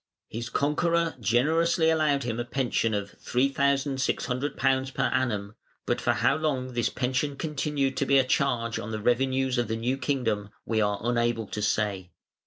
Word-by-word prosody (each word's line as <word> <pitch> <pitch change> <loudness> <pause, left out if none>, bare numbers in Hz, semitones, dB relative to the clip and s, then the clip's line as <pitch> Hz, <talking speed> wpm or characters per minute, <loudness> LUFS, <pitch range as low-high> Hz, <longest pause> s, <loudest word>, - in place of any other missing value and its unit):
His 115 +1 -5
conqueror 165 +3 +1
generously 160 - +2
allowed 150 -3 +2
him 120 -1 -3
a - - 0
pension 120 -3 0
of 100 0 -3
£3,600 135 0 0
per - - 0
annum, 105 -6 -1 0.3
but - - -1
for - - +2
how - - +2
long 135 -5 -2
this 120 -2 +1
pension 135 +3 -1
continued 145 -2 -1
to 140 - 0
be 140 - +5
a 135 - +5
charge 125 -3 0
on 105 - -6
the 110 -1 -3
revenues 130 +2 +1
of 120 - 0
the 110 +1 -2
new 125 +4 -1
kingdom 115 -9 -1 0.2
we 110 -1 +1
are 105 -1 +1
unable 120 -1 0
to 105 - -4
say. 100 -3 -1
130 Hz, 165 wpm, -27 LUFS, 115-140 Hz, 0.3 s, be